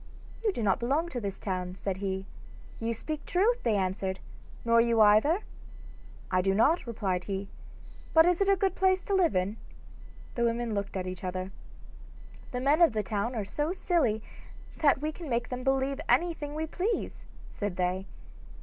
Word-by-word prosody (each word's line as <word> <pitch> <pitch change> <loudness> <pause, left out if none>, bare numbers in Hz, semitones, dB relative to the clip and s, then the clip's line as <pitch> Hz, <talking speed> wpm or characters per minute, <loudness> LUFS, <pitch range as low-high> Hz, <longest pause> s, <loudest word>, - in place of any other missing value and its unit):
'You 430 - +3
do 235 - -4
not 195 -3 +2
belong 285 +8 0
to 250 -6 -4
this 200 -2 -4
town,' 185 -2 -3
said 190 -1 -3
he. 190 -1 -3 0.5
'You 230 0 -1
speak 300 +7 -4
truth,' 435 +7 +2
they 225 -3 +1
answered, 190 0 -1 0.5
'nor 230 0 +5
you 230 -1 +2
either?' 215 - +5 0.9
'I 185 0 +3
do 195 +1 +1
not,' 280 - +3
replied 195 -6 -2
he, 195 0 -4 0.6
'but 320 0 +7
is 355 +1 +2
it 395 - +3
a 395 - +6
good 385 -1 +1
place 375 -1 +2
to 400 - -2
live 365 - +3
in?' 185 +4 0 0.8
The 235 - -1
women 235 -1 0
looked 200 -1 -3
at 185 - -3
each 185 0 -6
other. 185 +1 -3 1.0
'The 250 - -3
men 290 +5 +3
of 330 -8 +6
the 215 -1 0
town 210 +5 -2
are 215 -3 -2
so 295 - -2
silly 295 - +1 0.5
that 285 -2 +3
we 310 - 0
can 320 -1 -9
make 240 0 -1
them 250 0 -4
believe 270 +2 +1
anything 320 -4 +1
we 315 +1 -1
please,' 370 +8 -3 0.3
said 205 -3 -3
they. 185 +1 -1
235 Hz, 180 wpm, -29 LUFS, 195-315 Hz, 1.0 s, but